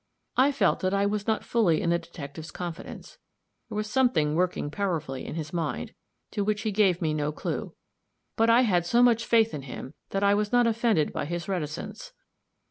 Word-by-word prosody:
I 270 +3 +5
felt 275 - +2
that 185 +1 0
I 200 0 +2
was 205 0 -1
not 220 -1 +1
fully 200 -9 +2
in 170 - 0
the 170 - +2
detective's 160 -2 -9
confidence; 180 - -7 0.5
there - - -6
was 210 0 -1
something 225 - +2
working 175 -3 0
powerfully 155 -9 -2
in - - -5
his 155 -1 -5
mind, 155 - -3 0.4
to 205 - -1
which 210 +1 -1
he 215 - 0
gave 190 -4 +2
me 155 -1 +1
no 150 -1 -1
clue; 155 - -4 0.6
but 225 +1 +3
I 235 +2 +6
had 185 -8 +2
so 235 +8 +3
much 230 -2 +3
faith 225 -1 +4
in 150 - -4
him 130 +1 -8 0.2
that 195 0 -1
I 200 0 +5
was 205 0 0
not 245 -1 +4
offended 225 -8 +2
by - - -2
his 170 +2 -4
reticence. 180 - -4
190 Hz, 200 wpm, -27 LUFS, 160-225 Hz, 0.6 s, I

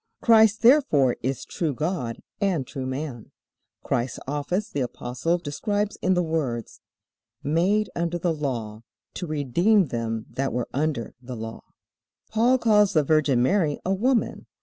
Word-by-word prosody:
Christ 220 -1 +5
therefore 230 - +5
is 130 -1 -2
true 155 -6 -2
God 150 -6 -3 0.2
and 180 -9 +1
true 130 +1 -5
man. 130 -3 -5 0.5
Christ's 120 +2 -1
office 150 +9 -2
the 145 - -4
Apostle 125 +7 -2
describes 205 +7 -2
in 185 0 +2
the 180 - +2
words: 145 -8 -3 0.6
"Made 185 +8 +1
under 170 0 -1
the 170 -1 0
law, 120 -8 -4 0.3
to 180 - -5
redeem 160 - +2
them 115 -2 -3
that 135 -3 -2
were 120 -1 -2
under 145 -5 -1
the 125 0 -7
law." 110 0 -7 0.7
Paul 235 +4 +4
calls 210 -4 +4
the 155 - +4
Virgin 145 -4 +3
Mary 160 -1 +1
a 190 - +1
woman. 240 +5 0
155 Hz, 145 wpm, -25 LUFS, 130-195 Hz, 0.7 s, Christ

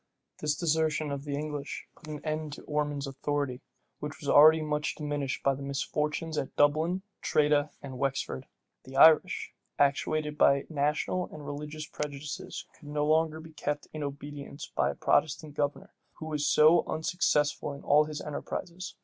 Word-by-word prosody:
This 150 -1 0
desertion 155 -2 +1
of 140 0 -4
the 145 -1 -2
English 150 -1 -4
put 160 - -15
an 150 0 -7
end 155 -1 -2
to - - -9
Ormond's 150 -1 -1
authority, 140 -1 -2 0.4
which 150 0 -6
was 145 - -8
already 155 +3 +8
much 150 -1 -1
diminished 145 -3 -3
by 140 - +3
the 135 - -7
misfortunes 150 +3 -2
at 135 - -5
Dublin, 160 +6 +2 0.2
Tredah, 150 0 +3
and 130 -2 -7
Wexford. 135 - -2 0.4
The 130 +1 -11
Irish, 160 +2 +6 0.2
actuated 150 +1 +1
by 140 0 +5
national 155 +4 0
and 150 -1 -9
religious 150 +1 -5
prejudices, 150 0 -5
could 150 - -16
no 150 0 0
longer 160 +1 +2
be 160 0 -12
kept 145 -1 -3
in 155 - -5
obedience 145 0 -6
by - - +2
a - - -3
Protestant 155 0 +1
governor, 145 -1 -2 0.2
who 155 - -9
was 150 -2 -1
so 155 +3 +6
unsuccessful 150 -2 +1
in 140 - -10
all 150 +1 +5
his 150 -1 -5
enterprises. 170 +4 -5
150 Hz, 160 wpm, -29 LUFS, 145-155 Hz, 0.4 s, already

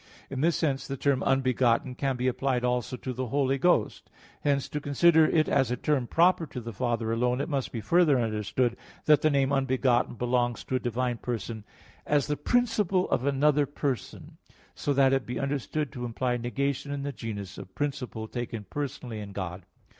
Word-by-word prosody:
In 135 -1 -3
this 165 +2 +3
sense 140 -5 -1
the 135 - -4
term 140 -1 +1
"unbegotten" 130 -2 +2
can 135 +1 -1
be 125 +1 -1
applied 130 -1 0
also 125 0 -1
to 130 +1 -5
the 130 +1 -3
Holy 135 +2 +1
Ghost. 175 -11 +1 0.3
Hence 140 -2 +1
to 150 - -3
consider 155 +3 +5
it 155 -2 +2
as 135 -4 +2
a 125 - -1
term 135 -2 0
proper 170 +1 +3
to 125 - -6
the 115 -1 -7
Father 115 0 -1
alone, 125 +2 +1
it 145 - -1
must 140 -3 -2
be 115 - -4
further 165 -2 +4
understood 115 +2 0 0.3
that 150 -1 +5
the 155 - +4
name 140 -2 +2
"unbegotten" 130 -3 +2
belongs 120 0 0
to 130 - -3
a - - +2
divine 125 0 -1
person 115 -2 -4 0.4
as 145 -2 +2
the 150 - -1
principle 210 - +1
of 130 - +1
another 145 +1 +3
person; 140 -5 -4 0.3
so 145 - -2
that 135 -1 +4
it 135 -1 +2
be 125 0 -3
understood 140 +1 -2
to 125 -3 -6
imply 125 +1 -1
negation 140 +4 -2
in 140 -1 -3
the 140 0 -3
genus 105 -4 -6
of 95 - -11
principle 125 -6 -3
taken 120 -2 -5
personally 130 -5 -5
in 100 -1 -8
God. 95 -2 -5
130 Hz, 190 wpm, -28 LUFS, 120-145 Hz, 0.4 s, consider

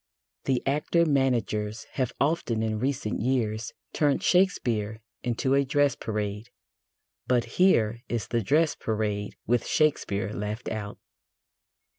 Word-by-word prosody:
The 130 -2 +1
actor 150 +4 +2
managers 120 -7 0
have 130 -3 -1
often 140 -7 +1
in 110 -1 -1
recent 130 -5 -1
years 115 -2 0 0.2
turned 150 +4 +2
Shakespeare 120 - +2 0.2
into 125 +2 0
a 140 0 +4
dress 145 0 +2
parade, 105 0 -4 0.8
but 125 -2 +3 0.2
here 115 - +4
is 120 -2 -2
the 120 -1 +1
dress 150 +10 +3
parade 105 -2 -2
with 120 +1 +1
Shakespeare 110 -9 +1
left 105 +3 -4
out. 105 -2 -5
120 Hz, 120 wpm, -27 LUFS, 110-140 Hz, 0.8 s, a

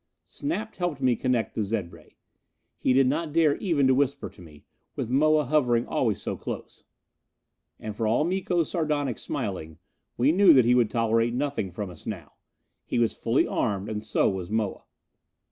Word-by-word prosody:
Snap 225 -7 -4
helped 175 -6 -2
me 130 -2 +2
connect 125 -2 -1
the - - -2
zed 100 -4 -2
ray. 80 -2 -17 0.6
He - - 0
did 135 +1 +5
not 150 +4 -1
dare 155 -2 +3
even 160 -8 +1
to 130 - +5
whisper 140 +1 0
to - - -17
me, 75 -4 -15 0.3
with 115 - -4
Moa 155 +2 +3
hovering 125 -4 +2
always - - 0
so - - -4
close. - - -8 0.9
And 110 -1 -6
for 110 0 -1
all 115 +7 +2
Miko's 175 -2 0
sardonic 150 - -1
smiling, 95 - -4 0.4
we 130 +5 +4
knew 185 0 +6
that 130 -4 +5
he 120 - +4
would 120 -3 +3
tolerate 115 0 +1
nothing 135 -7 -2
from 90 +1 -6
us 80 - -14
now. - - -6 0.5
He - - -3
was 115 -1 +2
fully 115 +3 +1
armed, 100 -4 -2
and 105 -1 -4
so 110 - +1
was 95 -2 -3
Moa. 110 -2 -2
125 Hz, 180 wpm, -26 LUFS, 110-150 Hz, 0.9 s, knew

